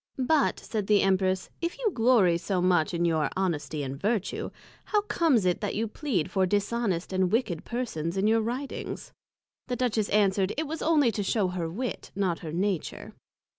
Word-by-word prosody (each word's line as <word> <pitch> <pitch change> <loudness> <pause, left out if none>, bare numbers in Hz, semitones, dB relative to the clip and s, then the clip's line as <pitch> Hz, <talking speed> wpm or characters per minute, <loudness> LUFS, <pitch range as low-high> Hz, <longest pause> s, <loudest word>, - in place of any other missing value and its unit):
But, 280 +3 +2
said 210 -3 -3
the 210 -1 +4
Empress, 190 -1 +1
if 340 +5 -2
you 475 -4 0
glory 225 -7 +4
so 185 +2 -1
much 175 -3 +3
in 170 -1 0
your 160 -3 +1
Honesty 160 -5 -1
and 135 0 -4
Vertue, 210 -1 -1 0.4
how 420 -1 +2
comes 320 - +2
it 180 +2 +1
that 205 - -2
you 225 +2 0
plead 210 - -2
for 190 -2 +2
Dishonest 205 -2 -1
and 185 -1 +1
Wicked 210 -8 0
persons, 195 -9 -3
in 195 - +1
your 225 +1 +4
Writings? 250 +5 -5 0.5
The 250 - -1
Duchess 235 -4 0
answered, 195 -1 +2
It 315 - 0
was 315 +2 -5
only 300 -7 +3
to 210 - -3
shew 200 -1 +1
her 175 -2 -3
Wit, 240 +9 -4
not 190 -4 0
her 160 -3 -6
Nature. 185 +1 -2
200 Hz, 180 wpm, -27 LUFS, 180-240 Hz, 0.5 s, the